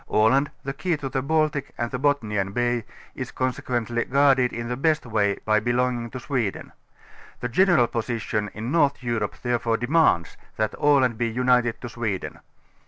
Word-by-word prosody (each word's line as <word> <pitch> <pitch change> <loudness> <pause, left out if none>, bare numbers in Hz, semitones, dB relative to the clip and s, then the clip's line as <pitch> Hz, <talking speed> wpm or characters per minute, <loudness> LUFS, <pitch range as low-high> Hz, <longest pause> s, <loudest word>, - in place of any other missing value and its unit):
Aland, 130 +7 +3
the 135 - -3
kej^ 175 +1 -1
to 135 - -4
the 130 - -1
Baltic 155 0 0
and 120 0 -2
the 125 - -3
Bothnian 105 -9 0
Baj^ 120 -2 0 0.3
is - - -5
consequently 120 -2 -1
guarded 135 -2 +3
in 115 0 -5
the 125 - -2
best 155 +3 +1
way 105 -3 +1
by 110 0 +3
belonging 120 +1 0
to 130 - -7
.Sweden. 120 -6 -3 0.7
The 125 - -3
general 175 -3 +4
posi 115 0 -3
tion 105 -2 -2
in 110 +4 -4
North 145 -5 +2
Europe 115 -4 -2
therefore 120 -2 0
demands, 120 - +2 0.2
that 110 -1 0
Aland 130 -6 +3
be 120 - +1
unit 125 +1 +2
ed 115 - -4
to 120 - -6
Sweden. 110 -5 -4
120 Hz, 170 wpm, -24 LUFS, 115-135 Hz, 0.7 s, general